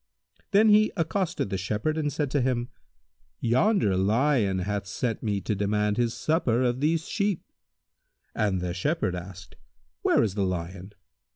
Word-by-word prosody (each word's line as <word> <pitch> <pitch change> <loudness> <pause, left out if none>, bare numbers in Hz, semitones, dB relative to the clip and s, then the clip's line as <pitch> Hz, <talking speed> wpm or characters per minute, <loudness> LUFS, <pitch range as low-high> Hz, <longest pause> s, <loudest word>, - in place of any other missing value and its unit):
Then 215 +1 +5
he 210 +1 +5
accosted 175 - -1
the 95 - -1
Shepherd 105 +10 -1
and 150 -2 -1
said 145 -1 -2
to 145 - +1
him, 125 -1 -1 0.7
"Yonder 125 - +2
lion 105 +1 +2
hath 100 +2 -2
sent 115 +3 -2
me 100 -3 -1
to 105 - -1
demand 105 +1 0
his 120 -1 0
supper 145 -7 +1
of 125 0 0
these 160 +3 0
sheep." 200 -3 -1 0.9
The 95 -4 -1
Shepherd 145 - -1
asked, 90 0 -9 0.4
"Where - - +3
is 105 -4 -1
the 100 -1 -1
lion?" 95 +2 -4
115 Hz, 150 wpm, -26 LUFS, 95-155 Hz, 0.9 s, Then